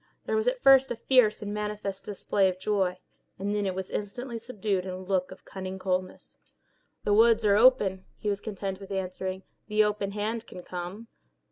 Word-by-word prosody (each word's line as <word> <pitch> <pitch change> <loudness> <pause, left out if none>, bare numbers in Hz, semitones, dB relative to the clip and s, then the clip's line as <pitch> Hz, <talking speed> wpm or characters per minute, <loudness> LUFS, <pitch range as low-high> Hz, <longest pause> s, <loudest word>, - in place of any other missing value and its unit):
There - - -1
was 440 +2 +1
at - - 0
first 270 0 +7
a - - -2
fierce 225 -3 +3
and 205 0 -4
manifest 210 -2 -4
display 200 -1 +1
of 185 - -4
joy, 190 -2 0 0.4
and 200 +2 -2
then 205 -1 0
it 185 - -2
was 190 0 -5
instantly 230 +4 -4
subdued 210 -5 -2
in 190 - -6
a 185 - -4
look 185 0 -1
of 185 - -13
cunning 190 0 -6
coldness. 185 -1 -3 0.7
"The 205 - +2
words 225 +1 +5
are 200 -1 +5
open," 205 -5 +4
he - - -6
was 200 -1 0
content 195 -3 -4
with 195 - -10
answering, 190 0 -3 0.2
"'The 215 0 +4
Open 205 -1 -1
Hand' 215 +2 -3
can 180 - -10
come." 180 +6 -6
200 Hz, 195 wpm, -28 LUFS, 190-215 Hz, 0.7 s, first